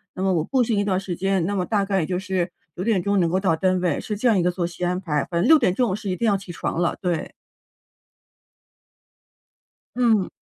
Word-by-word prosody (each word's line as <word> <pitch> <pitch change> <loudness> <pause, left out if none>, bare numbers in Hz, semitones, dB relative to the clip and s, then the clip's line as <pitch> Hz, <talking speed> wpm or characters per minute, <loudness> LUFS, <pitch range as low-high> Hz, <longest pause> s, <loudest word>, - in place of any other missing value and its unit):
那 185 - -3
么 190 -1 +2
我 165 -3 +1
步 255 - +1
行 225 -3 0
一 - - +2
段 200 -2 0
儿 - - 0
时 190 -2 -5
间， 190 -1 0
那 205 +3 -1
么 185 -2 0
大 205 -3 +1
概 195 -1 0
也 165 - 0
就 180 - -1
是 185 -1 -2 0.3
9 180 - -4
点 200 -4 +1
钟 200 +1 +1
能 170 -2 +2
够 185 +3 +1
到 185 -4 +2
单 185 +2 +1
位， 175 -5 0
是 210 - -4
这 245 - +1
样 220 -5 +4
一 - - +2
个 175 - +2
作 175 -1 -2
息 175 +1 -6
安 180 +1 0
排。 150 -6 -1
反 170 - -1
正 - - +2
6 315 0 +7
点 185 -9 +1
钟 245 0 +1
我 - - 0
是 210 -1 -5
一 185 - 0
定 235 - -2
要 210 -3 +3
起 195 -2 -6
床 165 - -3
了， 175 - +1
对。 175 -4 -2 2.6
嗯。 230 -6 +2
185 Hz, 270 characters per minute, -23 LUFS, 180-205 Hz, 2.6 s, 6